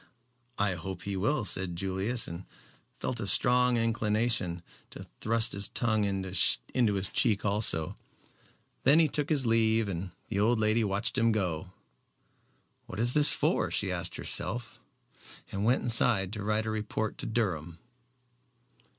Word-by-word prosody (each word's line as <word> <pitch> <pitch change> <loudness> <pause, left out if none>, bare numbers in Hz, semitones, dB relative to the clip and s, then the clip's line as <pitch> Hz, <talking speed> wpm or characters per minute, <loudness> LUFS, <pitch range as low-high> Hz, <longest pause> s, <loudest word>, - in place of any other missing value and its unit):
"I 100 -2 +1
hope 95 +2 -7
he 100 -1 -4
will," 110 +6 0
said 90 -1 -1
Julius, 95 +6 0
and 85 +2 -8 0.5
felt 120 - -3
a 105 - -3
strong 125 +2 +4
inclination 110 -5 -1 0.3
to - - -10
thrust 115 +1 +1
his 100 0 0
tongue 110 -3 -1
in 95 -1 -2
his 95 - +1
cheek 105 -5 +1
also. 100 -6 0 0.9
Then 140 +4 +5
he 165 -1 +4
took 150 0 -2
his 145 -5 +4
leave 115 -1 +2
and 90 -1 -5 0.2
the 100 - -2
old 115 +3 +2
lady 110 +1 +1
watched 105 +5 -2
him 115 0 +3
go. 90 -4 -3 1.2
"What 95 - -8
is 120 +2 +2
this 150 -1 +7
for?" - - 0
she - - -1
asked - - -2
herself, 120 -2 -4 0.7
and 100 +1 -3
went 125 +3 +2
inside 110 -5 +3
to 105 -2 -5
write 110 +1 -1
a 110 - -2
report 110 0 -4
to - - -5
Durham. 85 -8 -3
110 Hz, 150 wpm, -29 LUFS, 95-115 Hz, 1.2 s, this